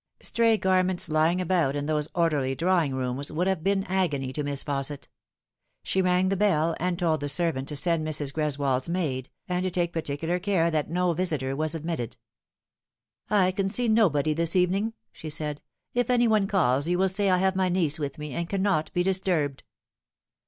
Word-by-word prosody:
Stray 230 -1 +3
garments 185 -2 +1
lying 160 +3 +2
about 170 -6 +1
in 145 0 -2
those 150 -1 0
orderly 150 -6 +1
drawing 170 -4 +1
rooms 130 +2 -3
would 165 +4 -1
have 190 -4 -1
been 195 0 +1
agony 150 -9 -1
to 150 - -3
Miss 140 -1 -1
Fausset. 140 0 -3 0.8
She 190 - 0
rang 180 0 +2
the 195 - +1
bell, 170 -5 +2
and 180 0 -1
told 165 -4 +1
the 145 0 -3
servant 145 -3 0
to 150 - -4
send 165 +2 +1
Mrs. 145 -3 -1
Greswold's 140 -3 -1
maid, 145 -8 -2 0.2
and 180 -1 -1
to 185 - 0
take 175 -1 -1
particular 165 +2 -2
care 180 -3 +1
that 155 -2 -1
no 180 0 +1
visitor 155 -6 -1
was 155 +2 -1
admitted. 155 -7 -4 0.6
" - - -67 0.2
I 190 -3 +3
can 195 +1 -1
see 245 +4 +1
nobody 160 -10 +3
this 165 +2 0
evening," 190 +5 +1 0.2
she 155 - -8
said. 150 -1 -3 0.2
'' - - -56
If 245 -1 0
any 240 -1 +4
one 215 -3 +2
calls 145 -7 +2
you 175 +1 +1
will 190 +1 +3
say 195 +1 +1
I 185 - +4
have 190 +1 +1
my 185 -1 +1
niece 170 -4 +2
with 140 -2 -4
me, 150 -2 -6
and 170 +3 -3
cannot 190 -5 0
be 175 - +1
disturbed." 180 -8 0
170 Hz, 195 wpm, -26 LUFS, 145-185 Hz, 0.8 s, any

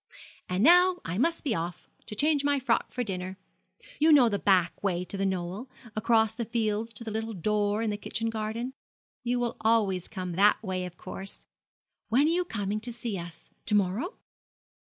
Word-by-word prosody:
And 180 +3 +1
now 360 +4 +6
I 175 +4 -2
must 330 +6 +1
be 270 - 0
off, 175 -2 -4 0.2
to 210 - -6
change 290 +4 +2
my 285 0 +2
frock 245 -3 0
for 250 - -2
dinner. 185 -3 -4 0.6
You 315 +2 +5
know 265 -6 +7
the 200 -2 -1
back 185 -4 +2
way 180 -2 0
to 200 - -6
The 195 0 0
Knoll 190 +6 -3 0.3
across 220 0 +3
the 235 +1 -3
fields 225 -1 -1
to 230 - -7
the 220 - -5
little 220 0 -3
door 210 +3 0
in 220 - 0
the 205 - -3
kitchen 225 +2 -2
garden. 225 +3 -3 0.5
You 245 0 0
will 240 -1 -2
always 210 -5 +2
come 185 -3 -5
that 200 +5 +4
way, 185 -2 -2
of 175 -1 -9
course. 190 +1 -9 0.6
When 255 +6 +4
are 315 - +3
you 355 +1 +1
coming 205 - -2
to 240 +3 -5
see 230 -2 -4
us? 170 -2 -9 0.2
To 210 - +2
morrow?' 205 - 0
215 Hz, 195 wpm, -28 LUFS, 190-240 Hz, 0.6 s, know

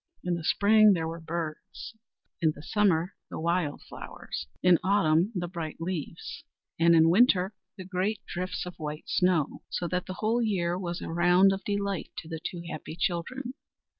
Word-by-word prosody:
In 180 - 0
the 170 -1 -3
spring 210 +4 +5
there 165 -3 -1
were 165 +1 -5
birds, 160 +5 -5 0.5
in 160 -2 +3
the 150 - -11
summer 185 -2 +2 0.2
the - - -5
wild 170 -2 0
flowers, 70 - -7 0.2
in 180 -2 +6
autumn 185 -1 +3
the 175 -1 -1
bright 165 -3 -6
leaves, 165 -3 -5 0.4
and 170 0 +6
in 165 0 +6
winter 195 -2 +4 0.2
the 185 - -7
great 190 +3 -1
drifts 180 +1 -4
of 180 - -6
white 150 0 -6
snow; 180 -5 +1
so 175 - -2
that 180 0 -2
the 185 - -5
whole 225 +4 +1
year 180 -6 0
was 175 -2 -4
a - - -5
round 180 +3 +5
of 195 - -5
delight 200 -3 -2
to - - -6
the 160 -1 -5
two 175 -2 -5
happy 155 -1 -6
children. 240 +11 -2
175 Hz, 175 wpm, -28 LUFS, 165-195 Hz, 0.5 s, in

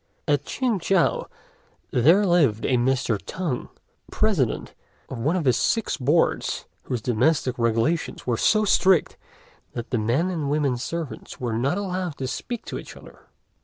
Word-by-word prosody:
At 145 -2 +1
Ch'ing 245 -6 -1
chow 185 0 +1 0.6
there 165 - +5
lived 150 - +3
a 130 - +2
Mr. 125 -4 +1
Tung, 165 -10 -3 0.4
President 185 - 0 0.4
of 130 - -6
one 150 +9 +1
of 180 - 0
the 130 -3 +4
Six 225 - +1
Boards, 150 +4 +1 0.2
whose 125 -3 -3
domestic 125 +1 +1
regulations 115 +8 0
were 120 - +1
so 215 - +3
strict 190 -4 +3 0.6
that 120 +1 -6
the 120 - +1
men 130 +12 +1
and 155 -5 -2
women 145 -3 +1
servants 160 +4 -6
were 120 -3 -2
not 135 - 0
allowed 185 -5 -3
to 130 - -3
speak 240 - -5
to - - -5
each - - -11
other. - - -16
145 Hz, 155 wpm, -24 LUFS, 125-180 Hz, 0.6 s, there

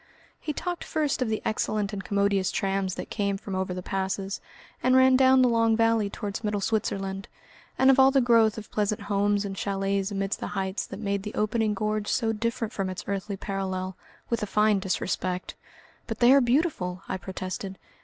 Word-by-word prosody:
He 305 - -3
talked 350 +3 -4
first 300 -4 -1
of 250 - +1
the 220 - -2
excellent 215 -1 -1
and 195 -1 -4
commodious 200 -1 +1
trams 195 -2 -1
that - - -7
came 200 -2 0
from 195 0 -7
over 185 0 -1
the 180 0 -4
passes, 195 +1 -2 0.4
and 255 0 +3
ran 260 0 +6
down 260 0 +6
the - - +5
long 230 -1 +3
valley 225 -2 +2
towards 205 +1 -5
middle 210 -1 0
Switzerland, 195 -2 -2 0.5
and 265 +1 +6
of 270 - +3
all 265 0 +8
the 270 0 +3
growth 230 -3 +4
of 215 - -8
pleasant 210 0 0
homes 205 0 +1
and 195 -1 -4
chalets 195 +1 -1
amidst 195 -1 -2
the - - -4
heights 190 0 -2
that - - -7
made 200 -1 -1
the 210 +1 -7
opening 215 0 +1
gorge 215 +1 -1
so 225 -3 +1
different 230 0 -2
from 195 -2 -2
its 185 +1 -5
earthly 200 0 -3
parallel, 190 -2 -3 0.3
with 235 - -1
a 210 - -2
fine 210 0 +3
disrespect. 185 -1 -2 0.5
"But 225 -1 -4
they 245 +2 +6
are 280 - +6
beautiful," 240 - 0
I - - -2
protested. 190 +1 -6
205 Hz, 195 wpm, -27 LUFS, 195-230 Hz, 0.5 s, all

